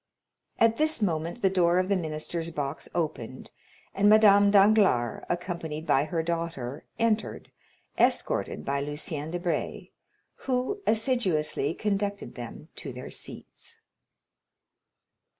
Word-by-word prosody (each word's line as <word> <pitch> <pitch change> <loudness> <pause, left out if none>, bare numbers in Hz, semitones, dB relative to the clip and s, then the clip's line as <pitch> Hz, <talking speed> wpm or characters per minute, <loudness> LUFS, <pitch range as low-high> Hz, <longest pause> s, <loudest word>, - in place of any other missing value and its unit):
At 225 0 +4
this 310 -2 +1
moment 170 +1 -2
the 190 - +5
door 175 -2 +3
of 185 0 +2
the 200 - +2
minister's 165 0 -3
box 145 -2 -4
opened, 150 -7 -3 0.4
and 205 +1 +4
Madame 205 -2 +7
Danglars, 200 - +4
accompanied 170 -3 -3
by 140 -2 +3
her 160 +1 -2
daughter, 165 -5 -4
entered, 225 -2 -1 0.5
escorted - - +1
by 140 0 0
Lucien 150 +1 -4
Debray, 175 +1 -3 0.6
who 260 +11 -1
assiduously 195 - +1
conducted 200 -1 -2
them 120 -2 -9
to - - -4
their - - -8
seats. - - -8
175 Hz, 115 wpm, -27 LUFS, 155-205 Hz, 0.6 s, Madame